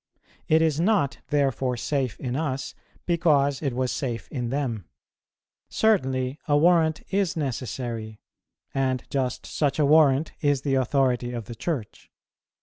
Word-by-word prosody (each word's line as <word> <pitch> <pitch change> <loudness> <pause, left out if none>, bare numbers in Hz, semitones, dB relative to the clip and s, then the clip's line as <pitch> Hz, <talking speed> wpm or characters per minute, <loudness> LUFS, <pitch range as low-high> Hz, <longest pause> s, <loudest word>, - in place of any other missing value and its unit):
It 160 +1 +4
is 155 -2 +1
not 165 - +1
therefore 135 -3 0
safe 130 -2 -2
in 125 -2 -3
us, 135 -3 -2 0.3
because 150 -5 +2
it 135 -5 -2
was 130 -1 0
safe 120 -1 -3
in 125 -4 -3
them. 120 - -2 0.8
Certainly 130 -11 +1
a 145 -1 +4
warrant 160 -1 +3
is 195 -4 0
necessary; 120 -5 -4 0.5
and 130 -2 0
just 130 -3 -2
such 145 -3 -1
a 150 - +3
warrant 150 0 +4
is 145 -3 +1
the 140 - 0
authority 130 -2 +1
of 115 -3 -5
the 120 - -7
Church. 120 -1 -5
135 Hz, 140 wpm, -25 LUFS, 125-155 Hz, 0.8 s, It